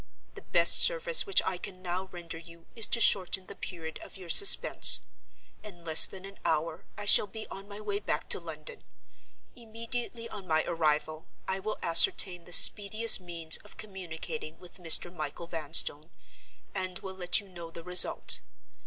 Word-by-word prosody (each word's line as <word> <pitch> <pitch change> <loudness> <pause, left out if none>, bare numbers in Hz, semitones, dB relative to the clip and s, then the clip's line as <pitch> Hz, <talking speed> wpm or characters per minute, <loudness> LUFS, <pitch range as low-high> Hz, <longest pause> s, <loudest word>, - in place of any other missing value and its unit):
The - - -13
best - - +4
service 485 -2 +3
which 395 - +2
I 185 - -4
can 185 0 -10
now 185 +1 -6
render 170 -2 -9
you 165 0 -17
is 225 -3 +2
to 230 - 0
shorten 190 -3 +2
the - - -11
period 160 -3 -10
of - - -13
your 185 -3 -13
suspense. 400 - +5 0.6
In 175 -5 -14
less 160 -1 +5
than 190 0 -12
an 195 0 -14
hour 160 +1 -4
I 205 - -8
shall 205 - +6
be 220 +1 -10
on 195 +1 -11
my 205 0 -12
way 205 -1 -5
back 160 -7 -5
to - - +1
London. 160 -3 -12 0.7
Immediately 230 +1 -8
on 200 -3 -11
my 155 0 -1
arrival, 155 -1 -3 0.2
I 190 0 -4
will 215 +3 -6
ascertain 175 - +3
the 175 - -15
speediest 215 +5 +5
means 170 -2 -1
of 210 - -18
communicating 185 -3 -9
with 180 0 -15
Mr. 175 +1 +2
Michael 155 +1 -7
Vanstone; 155 -1 0 0.6
and 185 -2 -5
will 190 -1 -10
let 180 -2 -1
you 205 - -13
know 170 -3 -12
the 165 0 -12
result. 180 +1 0
180 Hz, 170 wpm, -27 LUFS, 165-205 Hz, 0.7 s, shall